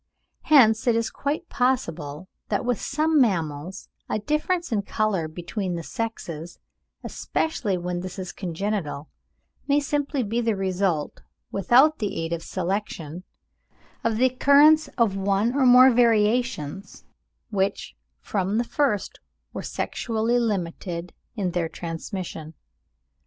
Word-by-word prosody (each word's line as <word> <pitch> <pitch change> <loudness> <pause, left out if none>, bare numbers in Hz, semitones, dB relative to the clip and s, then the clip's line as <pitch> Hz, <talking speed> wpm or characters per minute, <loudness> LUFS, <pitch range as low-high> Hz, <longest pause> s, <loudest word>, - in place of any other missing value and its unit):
Hence 230 -7 +5
it 235 - +4
is 230 0 0
quite 300 +5 -3
possible 170 - -1 0.2
that 205 +2 -1
with 245 -2 0
some 305 +1 +2
mammals 170 - -1 0.2
a - - 0
difference 300 - -1
in 215 -3 +1
colour 200 -5 -1
between 175 +3 -4
the 170 - -5
sexes, 170 -2 -5 0.5
especially 220 -12 -2
when 175 0 -3
this 185 +1 -7
is 185 -2 -5
congenital, 175 -5 -3 0.6
may 285 0 +4
simply 285 -1 -1
be 230 +3 -1
the 225 -2 +1
result, 190 -4 -1 0.3
without 255 - +4
the 210 -3 -2
aid 165 +1 -2
of 170 - -3
selection, 180 -3 -4 0.8
of 225 -1 0
the 255 - +4
occurrence 285 +4 +5
of 225 -5 +2
one 200 +4 +1
or 270 -2 +3
more 255 +1 +8
variations, 225 - +1 0.5
which 195 -1 -1 0.3
from 195 +1 -1
the 235 - +2
first 240 -6 -1 0.3
were - - -4
sexually 230 +1 -1
limited 180 -5 -3 0.2
in 195 -5 -1
their 170 -2 -1
transmission. 165 -1 -6
205 Hz, 125 wpm, -24 LUFS, 175-245 Hz, 0.8 s, more